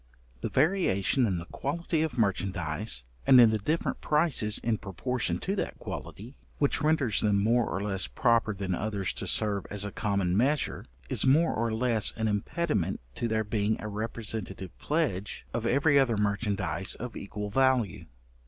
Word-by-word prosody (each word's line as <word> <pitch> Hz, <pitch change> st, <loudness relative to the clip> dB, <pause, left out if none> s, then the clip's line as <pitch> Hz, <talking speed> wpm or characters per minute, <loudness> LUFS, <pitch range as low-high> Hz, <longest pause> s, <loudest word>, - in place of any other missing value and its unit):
The -, -, -2 dB
variation 135 Hz, -, +2 dB
in 95 Hz, -4 st, 0 dB
the 85 Hz, -, -5 dB
quality 160 Hz, -, -2 dB
of 160 Hz, -4 st, -2 dB
merchandize, 95 Hz, -, -1 dB, 0.2 s
and 130 Hz, -, +8 dB
in 115 Hz, -2 st, +8 dB
the 110 Hz, -, 0 dB
different 155 Hz, +11 st, -1 dB
prices 150 Hz, -9 st, +2 dB
in 115 Hz, -2 st, 0 dB
proportion 120 Hz, +6 st, -2 dB
to 195 Hz, -, -1 dB
that -, -, -3 dB
quality, 120 Hz, +7 st, -8 dB, 0.2 s
which 145 Hz, 0 st, +1 dB
renders 150 Hz, -8 st, +2 dB
them 105 Hz, -2 st, +3 dB
more 115 Hz, +3 st, +2 dB
or 95 Hz, -, -2 dB
less 95 Hz, -2 st, 0 dB
proper 115 Hz, -3 st, +2 dB
than 95 Hz, -1 st, -2 dB
others 100 Hz, 0 st, -2 dB
to -, -, -5 dB
serve 105 Hz, -3 st, 0 dB
as 100 Hz, 0 st, -1 dB
a 100 Hz, -, -4 dB
common 100 Hz, -4 st, 0 dB
measure, 135 Hz, +7 st, +1 dB, 0.2 s
is -, -, +1 dB
also 130 Hz, -, +5 dB
more 165 Hz, +3 st, +3 dB
or 115 Hz, 0 st, -1 dB
less 115 Hz, -1 st, +1 dB
an 110 Hz, 0 st, 0 dB
impediment 105 Hz, -, -1 dB
to 120 Hz, -, -2 dB
their 110 Hz, -1 st, 0 dB
being 105 Hz, 0 st, 0 dB
a 110 Hz, -, -5 dB
representative 105 Hz, -3 st, -5 dB
pledge 130 Hz, -, -1 dB
of 115 Hz, 0 st, -1 dB
every 140 Hz, +3 st, +4 dB
other 120 Hz, -5 st, +2 dB
merchandize 100 Hz, -4 st, -1 dB
of 120 Hz, -1 st, -7 dB
equal 105 Hz, +1 st, -5 dB
value. 130 Hz, -4 st, +2 dB
110 Hz, 170 wpm, -29 LUFS, 100-130 Hz, 0.2 s, and